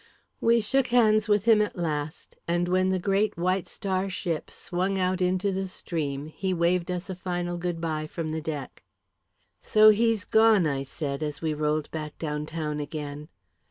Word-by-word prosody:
We 230 0 +4
shook 265 +4 +1
hands 220 -2 +4
with 205 -1 +3
him, 225 -2 +6
at 210 - -2
last; 155 -3 -4
and 175 +1 +1
when 185 +1 +2
the 190 - +1
great 195 +3 +1
White 185 +2 0
Star 190 0 -2
ship 175 -4 -3
swung 185 +2 -2
out 185 0 0
into 185 +2 +1
the 190 0 -2
stream, 150 -6 -4
he 185 +4 -3
waved 170 +1 +1
us 180 0 -3
a 190 - -4
final 175 -1 -3
good 175 -1 -3
bye 155 -2 -2
from 160 0 -4
the 160 0 -3
deck. 150 -4 -6 0.8
"So 215 0 +6
he's 225 -1 +3
gone," 220 -4 +5
I 140 -3 0
said, 140 +1 -4
as 150 0 -4
we 160 -1 0
rolled 150 0 -1
back 155 -2 -6
down 150 -1 -3
town 155 -2 -3
again. 150 0 -6
175 Hz, 180 wpm, -27 LUFS, 155-195 Hz, 0.8 s, him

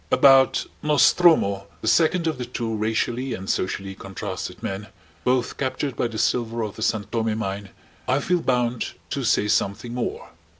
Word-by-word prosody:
About 135 -1 +5 0.2
Nostromo, 150 - +4
the - - -4
second 160 +9 +3
of 160 -5 -1
the 125 - -3
two 115 -2 -3
racially 115 +4 -1
and 95 +1 -8
socially 95 +1 -2
contrasted 95 0 -6
men, 100 +2 -4 0.4
both 125 -1 +1
captured 130 0 -2
by - - 0
the 115 -2 -7
silver 115 0 0
of 105 -2 -5
the - - -9
San 110 -2 +1
Tome 110 +1 -1
Mine, 100 -1 -4 0.4
I 130 +2 +2
feel 175 +4 0
bound 125 -3 0 0.2
to - - -2
say 105 - +2
something 105 +3 0
more. 125 -1 -4
115 Hz, 165 wpm, -24 LUFS, 105-130 Hz, 0.4 s, About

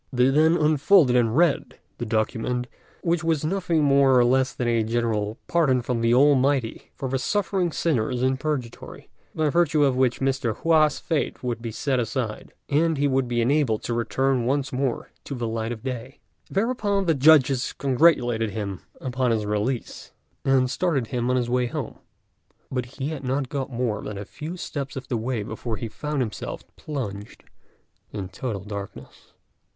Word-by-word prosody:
They 125 0 +3
then 160 +4 +4
unfolded 155 -2 +4
and 120 0 +2
read 170 -4 +2 0.2
the 120 - -3
document, 115 +3 -1 0.4
which 170 -1 +1
was 160 -2 0
nothing 170 -2 +1
more 140 -2 +5
or 120 - +5
less 130 +1 +2
than 125 - -3
a 115 -1 +2
general 110 -2 -1
pardon 135 -8 +2
from 115 -1 -1
the 115 0 +2
Almighty 135 -2 +3
for 135 - -4
the 135 +1 -1
suffering 190 0 0
sinners 125 -6 0
in 130 0 +2
Purgatory, 135 -5 -5 0.3
by 155 -1 +1
virtue 160 -3 +3
of 135 -3 +3
which 130 -1 +1
Mr. 130 -5 0
Hua's 155 -3 +3
fate 150 -5 -2
would 120 -2 -2
be 115 - -4
set 130 +4 -1
aside, 115 -1 -3 0.2
and 160 +2 +2
he 145 +1 +2
would 135 -2 +1
be 120 -1 0
enabled 125 -3 +1
to 120 - -2
return 130 +2 0
once 135 0 0
more 130 -1 -2
to 140 - -6
the 120 -2 -3
light 115 0 -3
of 110 -2 -6
day. 130 0 -6 0.3
Thereupon 205 -2 0
the 165 - +3
judges 140 -3 +4
congratulated 125 -5 +2
him 100 -2 -5 0.2
upon 130 -1 -1
his 110 -2 0
release, 105 +4 -3 0.3
and 135 -1 +3
started 140 -7 0
him 120 -1 -1
on 125 - +2
his 125 -2 0
way 125 0 +1
home; - - -5 0.7
but 125 -2 -2
he 140 +1 -2
had 155 -3 -5
not 130 0 -1
got 140 -1 -3
more 115 -4 -1
than 105 - -6
a 100 - -6
few 160 - -7
steps 140 -5 -5
of 130 -1 -7
the 120 - 0
way 115 -1 -2
before 110 +1 -5
he 115 - -4
found 150 +5 -3
himself 110 - -6
plunged 105 -9 -6 0.7
in 95 -3 -5
total 100 0 -5
darkness. 100 -1 -9
130 Hz, 175 wpm, -24 LUFS, 115-145 Hz, 0.7 s, more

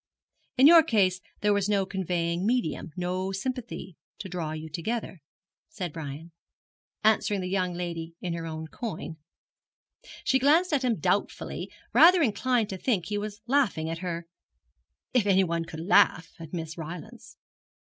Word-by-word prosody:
In 260 - +6
your 330 +2 +10
case 190 - +2 0.2
there 210 0 +3
was 200 0 0
no 200 -2 +2
conveying 175 -2 -1
medium, 225 -8 -1
no 185 +1 -2
sympathy 235 - -5 0.2
to 195 - -7
draw 170 -4 -4
you 155 0 -6
together,' 185 +5 -4 0.5
said 180 - -5
Brian, 160 +1 -7 0.7
answering 210 -2 +3
the 180 - -3
young 185 -1 -1
lady 170 -2 -5
in 175 -2 -3
her 165 -1 -4
own 160 0 -5
coin. 165 -3 -6 1.1
She 265 - +3
glanced 315 +6 +4
at 275 -3 +2
him 245 -3 +2
doubtfully, - - -1 0.2
rather 350 0 +7
inclined 240 -1 +1
to 190 - -5
think 205 -8 0
he 205 -1 -2
was 210 +1 -6
laughing 235 - +1
at 165 - -4
her, 170 -2 -4 0.9
if 235 -5 +3
any 190 -1 +5
one 170 -2 -1
could 160 -1 -7
laugh 175 -1 +4
at 165 -2 -9
Miss 165 -1 -5
Rylance. 215 +8 -9
185 Hz, 155 wpm, -27 LUFS, 170-225 Hz, 1.1 s, your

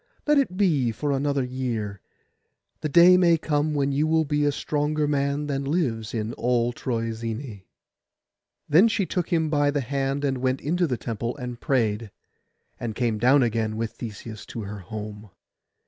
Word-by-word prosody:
Let 295 -1 +4
it 185 -10 -1
be 150 - +2
for 140 +7 -2
another 140 0 0
year. 120 -6 -3 0.8
The 155 - -2
day 175 +4 +7
may 170 -2 +5
come 150 -1 0
when 140 -1 +1
you 145 +3 +1
will 160 0 +2
be 150 0 +1
a 145 - +3
stronger 150 +1 -1
man 140 0 0
than 140 -1 -2
lives 135 -8 -1
in 110 +1 -2
all 120 0 +1
Troezene.' 115 -1 -4 1.1
Then 170 +9 +6
she 210 -3 0
took 180 -1 -2
him 160 -3 +1
by 145 -1 +3
the 145 0 0
hand, 135 +2 -1
and 135 -2 0
went 130 +1 0
into 175 +4 0
the 125 -4 -1
temple 115 +3 -4
and 125 -2 -6
prayed, 115 -6 0 0.7
and 115 -3 -4
came 115 -3 0
down 130 +4 +5
again 110 -2 -1
with 115 0 -2
Theseus 110 -1 -8
to 115 - -6
her 100 +1 -6
home. 105 +2 -8
135 Hz, 170 wpm, -25 LUFS, 115-150 Hz, 1.1 s, day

